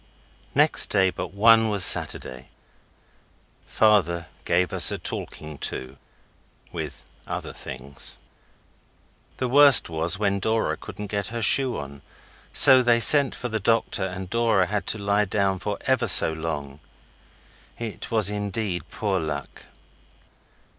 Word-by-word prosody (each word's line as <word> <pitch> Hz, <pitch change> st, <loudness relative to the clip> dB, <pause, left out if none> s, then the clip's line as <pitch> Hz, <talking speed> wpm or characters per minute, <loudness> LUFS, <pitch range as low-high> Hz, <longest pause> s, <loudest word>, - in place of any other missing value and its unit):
Next -, -, +4 dB
day 95 Hz, -1 st, +1 dB
but -, -, -7 dB
one 115 Hz, +2 st, +3 dB
was 100 Hz, -4 st, +1 dB
Saturday. 65 Hz, +1 st, -1 dB, 1.2 s
Father 90 Hz, -6 st, +1 dB, 0.2 s
gave 90 Hz, +1 st, 0 dB
us -, -, +4 dB
a -, -, -4 dB
talking 75 Hz, -2 st, -7 dB
to 65 Hz, +1 st, -6 dB, 0.7 s
with -, -, -8 dB, 0.2 s
other -, -, -6 dB
things. 70 Hz, +2 st, -8 dB, 1.2 s
The 130 Hz, -, -3 dB
worst 140 Hz, -2 st, +6 dB
was 80 Hz, +3 st, -1 dB
when 100 Hz, -1 st, -1 dB
Dora 110 Hz, +3 st, -1 dB
couldn't 105 Hz, -, -10 dB
get 100 Hz, -2 st, -2 dB
her 115 Hz, +1 st, -5 dB
shoe 130 Hz, +3 st, +5 dB
on, 70 Hz, 0 st, -9 dB, 0.5 s
so 130 Hz, -1 st, +7 dB
they 120 Hz, -1 st, +2 dB
sent 140 Hz, +3 st, +3 dB
for 125 Hz, -, -6 dB
the 110 Hz, -1 st, -3 dB
doctor, 115 Hz, -2 st, 0 dB
and 95 Hz, 0 st, -7 dB
Dora 115 Hz, -3 st, 0 dB
had 105 Hz, +2 st, -4 dB
to -, -, 0 dB
lie 100 Hz, 0 st, 0 dB
down 95 Hz, -1 st, -2 dB
for 105 Hz, +1 st, -5 dB
ever 130 Hz, -3 st, -1 dB
so 85 Hz, -4 st, +6 dB
long. 75 Hz, -3 st, -6 dB, 1.0 s
It 115 Hz, -3 st, -7 dB
was 110 Hz, -4 st, +3 dB
indeed 100 Hz, -4 st, -4 dB
poor 100 Hz, -3 st, -3 dB
luck. 75 Hz, -3 st, -7 dB
100 Hz, 135 wpm, -23 LUFS, 85-115 Hz, 1.2 s, so